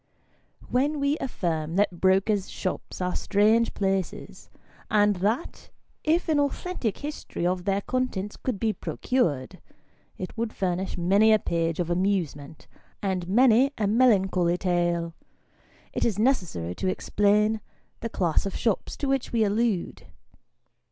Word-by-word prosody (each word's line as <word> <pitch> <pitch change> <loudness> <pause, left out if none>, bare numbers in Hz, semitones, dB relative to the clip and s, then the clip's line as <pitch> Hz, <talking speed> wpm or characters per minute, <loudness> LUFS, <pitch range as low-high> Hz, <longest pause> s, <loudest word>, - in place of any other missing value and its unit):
WHEN 285 +4 +1
we 280 +1 +1
affirm 165 - -2
that 190 -3 +1
brokers' 195 +1 +2
shops 185 - -5
are 180 0 -1
strange 215 +3 +2
places, 195 -2 -3 0.4
and 205 -2 +3
that 215 - -2 0.3
if 330 +4 +1
an 310 -2 +2
authentic 285 - -2
history 295 - -5
of 180 0 -1
their 195 0 +1
contents 215 -5 -2
could 245 -7 -3
be 220 -2 +1
procured, 165 - -2 0.6
it 185 - -6
would 230 -1 -3
furnish 185 0 -2
many 200 +5 +4
a 215 - +6
page 165 -4 -1
of 175 -1 -1
amusement, 170 -5 -1 0.4
and 185 -3 -1
many 250 +5 +5
a 215 - 0
melancholy 195 -6 +3
tale, 175 -2 0 0.8
it - - -1
is 215 -5 +1
necessary 180 - 0
to 190 - -3
explain 210 +3 +2 0.4
the 230 - -4
class 175 -2 0
of 195 - -6
shops 225 -4 -1
to 285 - -2
which 270 -1 0
we 230 -2 +2
allude. 210 -2 -1
200 Hz, 135 wpm, -26 LUFS, 180-230 Hz, 0.8 s, a